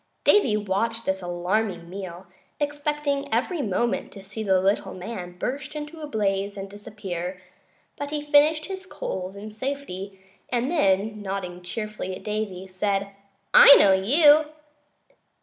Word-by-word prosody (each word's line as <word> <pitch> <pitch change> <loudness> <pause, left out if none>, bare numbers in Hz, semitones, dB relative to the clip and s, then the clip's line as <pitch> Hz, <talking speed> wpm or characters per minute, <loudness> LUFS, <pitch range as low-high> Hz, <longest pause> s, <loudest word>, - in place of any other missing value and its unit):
Davy 260 - +4
watched 220 +3 -1
this 190 0 -1
alarming 175 +1 -1
meal, 185 -1 -7 0.3
expecting 290 -1 -1
every 275 +9 0
moment 235 +1 -1
to 195 - -11
see 210 +3 -7
the 190 -3 +3
little 195 0 0
man 180 -2 -7
burst 275 +9 -4
into 300 +2 -7
a 300 - -5
blaze 200 -4 -1
and 195 0 -5
disappear; 195 -3 -6 0.6
but 285 0 -4
he 300 0 -2
finished 300 +1 +4
his 380 -1 -7
coals 190 - -5
in 210 +2 -8
safety, 210 -6 -5 0.3
and 250 +3 0
then, 210 - +1
nodding 190 -3 -5
cheerfully 210 0 -5
at - - -11
Davy, 210 -3 -3
said: 195 +1 -1 0.4
"I 280 - +11
know 195 - +6
you!" 290 - +5
210 Hz, 140 wpm, -25 LUFS, 190-280 Hz, 0.6 s, I